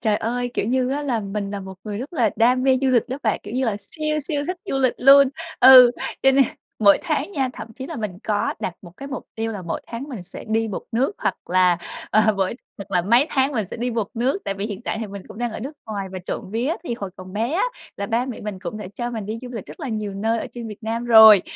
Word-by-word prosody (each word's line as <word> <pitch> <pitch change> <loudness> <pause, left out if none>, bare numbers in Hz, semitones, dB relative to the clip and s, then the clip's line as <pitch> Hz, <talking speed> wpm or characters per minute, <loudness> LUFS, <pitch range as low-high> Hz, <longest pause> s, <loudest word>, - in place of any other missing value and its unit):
Trời 215 -3 +2
ơi, 245 +3 -2
kiểu - - 0
như 255 +2 +1
á 290 +2 -1
là 250 -6 0
mình 200 0 -4
là 200 -1 -4
một 190 0 -8
người 210 -1 -4
rất 265 +8 -6
là 235 -10 +2
đam 250 +2 +4
mê 260 -1 +4
du 270 - +3
lịch 255 -1 +2
đó 260 - -3
bạn, 215 -3 0
kiểu 205 - -8
như 260 +1 +1
là 220 -4 0
siêu 305 +6 -3
siêu 295 0 -2
thích 365 - -2
du 270 - -2
lịch 260 -2 +2
luôn. 275 +1 +8 0.3
Ừ, 255 -1 +10 0.3
cho 270 - +6
nên 270 0 +5 0.3
mỗi 200 -2 +6
tháng - - -1
nha 270 -7 0
thậm 225 -3 -8
chí 260 0 -7
là - - -6
mình 210 -5 -4
có 205 -1 0
đặt 180 - -3
một 175 -3 -12
cái 275 - -8
mục 275 - -5
tiêu 225 0 -2
là 200 -3 -6
mỗi 170 - -3
tháng 235 +3 -6
mình 240 -10 -6
sẽ 175 - -10
đi 225 +1 +1
một 200 - -4
nước, 255 - +1
hoặc - - 0 0.2
là, 180 -1 +4 0.3
ờ, 215 - +5
mỗi 195 +2 0 0.2
hoặc 200 - -9
là 180 - +2
mấy 235 - +4
tháng 270 +1 +2
mình 220 -5 0
sẽ - - -5
đi 245 +2 -2
một 225 -4 -2
nước. 250 +9 0
Tại 195 - -2
vì 195 +1 -3
hiện 205 -2 -6
tại 220 - -3
thì 220 - -3
mình 200 -1 -8
cũng - - -11
đang 240 -1 -2
ở - - -6
nước 270 +6 -5
ngoài, 200 -3 -4
và 190 - -4
trộm 180 +1 -6
vía 240 +8 0
thì 240 - -2
hồi 200 -5 -6
còn 185 0 -10
bé 225 +6 -1
á 350 - +1 0.3
là 200 - -3
ba 235 +4 0
mẹ 255 - -6
mình 210 -2 -5
cũng 215 - -5
đã 210 - -6
cho 240 0 -3
mình 220 -4 -5
đi 220 +2 -4
du 250 - -7
lịch 225 -5 -6
rất - - -11
là 285 - -4
nhiều 215 -3 -3
nơi 225 +3 0
ở - - -4
trên 235 -2 -6
Việt 210 +1 -10
Nam 225 +2 -2
rồi. 220 -4 +9
225 Hz, 285 wpm, -22 LUFS, 205-255 Hz, 0.3 s, Ừ